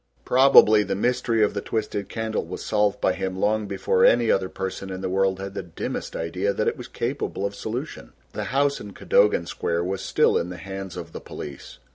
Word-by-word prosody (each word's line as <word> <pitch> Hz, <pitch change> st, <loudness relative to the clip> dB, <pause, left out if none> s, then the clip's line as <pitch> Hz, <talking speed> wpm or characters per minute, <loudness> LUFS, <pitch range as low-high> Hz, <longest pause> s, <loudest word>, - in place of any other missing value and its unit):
Probably 125 Hz, -5 st, +7 dB
the 100 Hz, -1 st, -2 dB
mystery 115 Hz, +1 st, +1 dB
of 105 Hz, -, +2 dB
the 100 Hz, -, -3 dB
twisted 105 Hz, -2 st, -3 dB
candle 110 Hz, -1 st, -2 dB
was -, -, -7 dB
solved 105 Hz, -1 st, +1 dB
by 95 Hz, -, +2 dB
him 95 Hz, 0 st, -3 dB
long 105 Hz, +1 st, +1 dB
before 95 Hz, -1 st, +1 dB
any 120 Hz, -1 st, +5 dB
other 95 Hz, -1 st, +1 dB
person 95 Hz, 0 st, -5 dB
in 95 Hz, 0 st, -5 dB
the 95 Hz, -, -2 dB
world 95 Hz, 0 st, +1 dB
had 100 Hz, 0 st, -6 dB
the -, -, -3 dB
dimmest 85 Hz, -3 st, -5 dB
idea 90 Hz, +5 st, -1 dB
that 105 Hz, -, -1 dB
it -, -, +1 dB
was 125 Hz, -, -9 dB
capable 120 Hz, -4 st, -3 dB
of 100 Hz, -, -2 dB
solution. 110 Hz, -, -6 dB, 0.2 s
The -, -, -3 dB
house 140 Hz, +1 st, +1 dB
in 100 Hz, -1 st, -9 dB
Cadogan 100 Hz, -4 st, +3 dB
Square 85 Hz, 0 st, -2 dB
was 95 Hz, +1 st, -3 dB
still -, -, +2 dB
in 85 Hz, -, -3 dB
the 90 Hz, -, -7 dB
hands 95 Hz, +1 st, -7 dB
of 85 Hz, -1 st, -7 dB
the -, -, -8 dB
police. 70 Hz, -2 st, -9 dB
100 Hz, 210 wpm, -24 LUFS, 95-110 Hz, 0.2 s, Probably